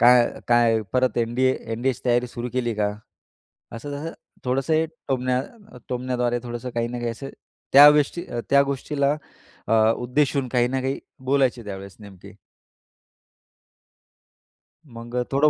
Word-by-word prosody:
काय 120 0 +6 0.2
काय. 120 -2 +4
परत 130 0 +1
एन-डी-ए 120 +3 +2 0.2
एन-डी-एची 125 +2 -1
तयारी 120 0 +2
सुरू 120 0 -5
केली 120 -3 -1
का? 105 -1 0 0.9
असं 145 +5 -7
तसं 155 +4 -5 0.3
थोडंसं 130 +4 0
हे 160 +1 +2 0.2
टोमण्या 130 -1 0 0.5
टोमण्याद्वारे 125 -1 -1
थोडंसं 120 +1 -5
काही 115 0 0
ना 120 0 -5
काही 120 -1 -2
असं 135 +4 -7 0.4
त्या 145 +2 +11
गोष्टी 150 +4 +1 0.3
त्या 140 0 +6
गोष्टीला 140 +1 0 0.5
अ, - - +1 0.2
उद्देशून 130 +1 0
काही 120 0 +2
ना 130 0 -1
काही 135 +1 -1 0.3
बोलायचे 130 -4 +2
त्यावेळेस 100 -1 -8
नेमके. 100 -3 -13 2.7
मग 120 +1 -8 0.2
थोडं 145 +3 +4
125 Hz, 130 wpm, -24 LUFS, 120-135 Hz, 2.7 s, त्या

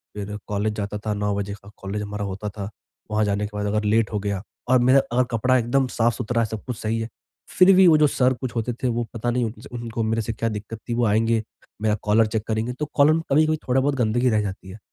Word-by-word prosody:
फिर 105 0 -5
कॉलेज 105 +1 -1
जाता 105 0 -3
था 105 - +1
9 105 0 -1
बजे 100 0 -3
का 100 - -13
कॉलेज 100 +2 -4
हमारा 105 0 -4
होता 100 +2 -4
था। 100 -1 -6 0.4
वहाँ 105 0 +2
जाने 100 0 0
के 105 0 -8
बाद 105 - -2
अगर 105 +1 0
लेट 105 0 +2
हो 105 - 0
गया 100 -2 -2 0.3
और 130 0 +5
मेरा 130 +3 +5
अगर 125 +1 +4
कपड़ा 125 +3 +2
एकदम 130 +3 +1
साफ-सुथरा 120 0 0
है - - +2
सब 110 -1 -6
कुछ 125 -4 -4
सही 110 +1 -2
है, 115 0 -4 0.4
फिर 185 +1 +6
भी 190 0 +7
वो 160 -2 +7
जो 150 0 +5
सर 130 -2 +2
कुछ 130 -2 -4
होते 120 +1 -1
थे - - +3
वो 120 0 0
पता 120 +1 -2
नहीं 125 0 +1
उन्स 110 +2 -7
उनको 115 -1 -3
मेरे 110 +1 0
से 110 +1 -3
क्या 115 +1 -1
दिक्कत 105 +1 -6
थी - - 0
वो 120 0 +2
आएँगे, 110 +1 +2 0.4
मेरा 105 -1 +2
कॉलर 110 +2 +4
चेक 105 0 -2
करेंगे, 110 +2 -1
तो 150 +4 -3
कॉलर 145 +1 +6
में 165 - +1
कभी-कभी 155 +2 +4
थोड़ा 130 +1 +3
बहुत 140 +1 +1
गंदगी 120 0 +2
रह 110 -2 +2
जाती 95 -2 -6
है। 95 - -9
115 Hz, 255 wpm, -23 LUFS, 105-125 Hz, 0.4 s, भी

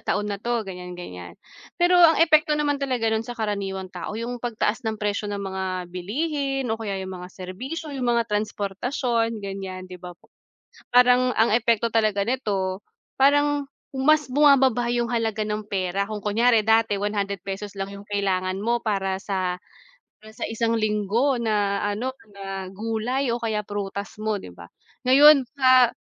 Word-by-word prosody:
taon 210 0 -1
na 200 - -5
'to, 235 -1 -1
ganyan 180 -1 -8
ganyan. 90 - -9 0.4
Pero 355 +1 +4
ang 330 -2 +7
epekto 305 -1 +3
naman 290 -1 0
talaga 250 -5 0
nun 220 - +1
sa 240 +1 -8
karaniwang 195 -4 -3
tao, 180 +4 -5
yung 240 +2 -4
pagtaas 230 -1 -1
ng 220 - -2
presyo 205 0 -2
ng 200 -1 -4
mga 190 0 -3 0.3
bilihin 270 - -2
o 225 - -4
kaya 205 -3 -3
yung 185 -1 -7
mga 180 - -8
serbisyo, 255 - -7
yung 255 -3 -2
mga 235 - +2
transportasyon 225 +3 -1
ganyan, 190 -1 -6
di 180 -1 -11
ba, 180 -1 -9
po. - - -29 0.6
Parang 250 +1 +5
ang 225 0 +3
epekto 230 0 +2
talaga 215 -3 +2
nito, 200 -6 -1 0.4
parang 290 +1 +3 0.2
mas 300 +3 +3
bumababa 265 -3 +4
yung 240 0 0
halaga 225 -2 0
ng 210 0 -4
pera, 195 0 -1
kung 210 -2 -6
kunyari 225 +1 +3
dati 225 -1 +3
one 205 +1 -2
hundred 200 -1 -3
pesos 200 +1 -6
lang 195 0 -4
yung 200 +1 -11
kailangan 190 -2 0
mo 235 +4 0
para 195 -4 -1
sa 185 -3 -2 0.6
para 215 +1 -15
sa - - -17
isang 230 0 0
linggo 215 +4 +1
na 205 -3 0
ano 240 +6 -3 0.2
na 195 -1 -6
gulay 225 +5 -2
o 235 - 0
kaya 220 -3 -1
prutas 200 0 -5
mo, 215 -2 -2
'di - - -10
ba, 85 0 -12 0.4
ngayon 280 +1 +7
sa 255 -3 +5
215 Hz, 170 wpm, -24 LUFS, 195-245 Hz, 0.6 s, ang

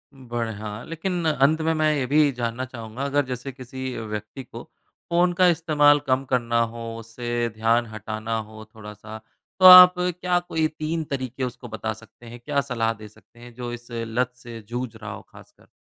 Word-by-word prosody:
बढ़िया। 115 -4 -5
लेकिन 170 +1 -3
अंत 155 +2 +2
में 160 +1 +1
मैं 155 -1 +2
ये 135 -3 -1
भी 145 +1 +4
जानना 120 +2 -2
चाहूँगा 120 0 -7
अगर 140 0 +1
जैसे 125 +1 -5
किसी 130 0 -7
व्यक्ति 105 +3 -6
को 125 - -10 0.5
फ़ोन 175 +1 +3
का 180 +1 +4
इस्तेमाल 150 -3 +4
कम 130 +1 +2
करना 120 -2 +1
हो, 115 0 -4
उससे 120 +1 -3
ध्यान 115 +2 +2
हटाना 110 +1 -4
हो 110 0 -8
थोड़ा-सा, 105 0 -10 0.4
तो 185 - +5
आप 180 0 +12
क्या 180 0 0
कोई 160 -2 -1
तीन 155 +1 -3
तरीके 130 -3 -4
उसको 125 0 -5
बता 110 -1 -4
सकते 115 +2 -17
हैं? 120 +1 -10
क्या 145 -1 +1
सलाह 115 -4 -1
दे 105 -1 -12
सकते 110 +2 -22
हैं 120 0 -13
जो 120 0 -5
इस 120 0 -9
लत 115 +2 -2
से 120 -2 -10
जूझ 120 -1 -4
रहा 110 -1 -8
हो - - -9
खासकर? - - -18
120 Hz, 180 wpm, -24 LUFS, 115-145 Hz, 0.5 s, आप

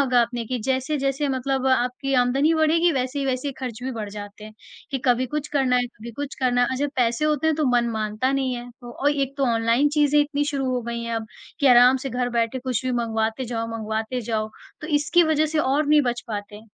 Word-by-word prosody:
होगा 255 -3 +3
आपने 235 0 -3
कि 250 0 -2
जैसे-जैसे 275 +1 0
मतलब 265 0 -1
आपकी 260 +2 0
आमदनी 275 +6 +2
बढ़ेगी 325 +2 +3
वैसे 260 +1 -2
ही 275 - -1
वैसे 265 +2 -2
ख़र्च 245 -2 -5
भी 260 0 -3
बढ़ 215 -3 -5
जाते 205 0 -9
हैं 215 - -11 0.4
कि 270 - -1
कभी 250 +1 +3
कुछ 300 +2 -4
करना 265 -3 +2
है, 245 0 +1
कभी 235 0 -11
कुछ 285 -1 -5
करना 245 -1 +2
है - - +3
और 260 - -2
जब 290 0 -1
पैसे 240 +3 +1
होते 305 0 +1
हैं 315 -1 +2
तो 305 - +1
मन 235 0 +1
मानता 220 +4 -1
नहीं 265 -2 0
है। 240 0 -7
तो 240 +4 -2
एक 275 -1 -1
तो 275 - +2
ओनलाइन 230 +5 +2
चीज़ें 295 0 +4
इतनी 290 0 0
शुरू 280 -2 -2
हो 250 - 0
गई 235 0 -4
हैं 230 0 -3
अब 220 -1 -4 0.3
कि 280 - +3
आराम 250 +1 +7
से - - -3
घर 245 0 -1
बैठे 230 +3 0
कुछ 255 -1 -3
भी 255 - 0
मँगवाते 225 0 -1
जाओ, 230 -1 -3
मँगवाते 220 +3 -3
जाओ, 215 -1 -2 0.3
तो 305 - -6
इसकी 305 +4 +3
वजह 310 0 +2
से 310 0 -2
और 290 +1 +1
नहीं 300 -1 +5
बच 245 -1 -1
पाते। 205 0 -6
255 Hz, 235 wpm, -23 LUFS, 235-285 Hz, 0.4 s, आराम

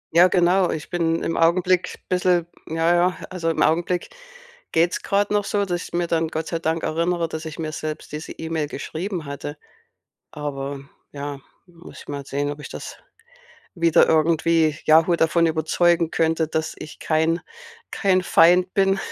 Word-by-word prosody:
Ja, 175 +2 +8
genau. 180 0 +3
Ich 150 -1 -5
bin 165 -1 0
im 165 - -2
Augenblick 180 +2 +2
bisschen 180 -2 +2 0.2
ja, 165 +2 +1
ja 180 +1 +2
also 170 -3 -2
im 165 - +1
Augenblick 175 +3 0 0.6
geht's 170 +2 +1
grad 205 +1 0
noch 205 0 +2
so, 200 0 0
dass 175 -2 -2
ich - - -13
mir 175 0 0
dann 165 -1 0
Gott 160 0 -4
sei 165 - -2
Dank 160 0 -1
erinnere, 170 +1 0
dass 160 0 -6
ich 155 - -7
mir 155 -1 -4
selbst 155 -1 -6
diese 150 +1 -6
E-Mail 160 -2 -3
geschrieben 175 +3 -5
hatte. 140 +1 -6 0.7
Aber, 140 -1 -5 0.3
ja, 145 -1 -6 0.3
muss 175 -1 -14
ich - - -15
mal 140 -1 -5
sehen, 145 +1 -2
ob 145 +1 -6
ich - - -8
das - - -8 0.8
wieder 170 -2 +4
irgendwie 160 -1 +2
Yahoo 165 +2 +5
davon 165 +1 +3
überzeugen 165 +1 +2
könnte, 160 -1 +1
dass 160 0 -2
ich 155 - -10
kein 160 +2 +1 0.5
kein 185 -2 +2
Feind 180 +1 +4
bin, 195 0 +3
165 Hz, 165 wpm, -22 LUFS, 155-175 Hz, 0.8 s, Ja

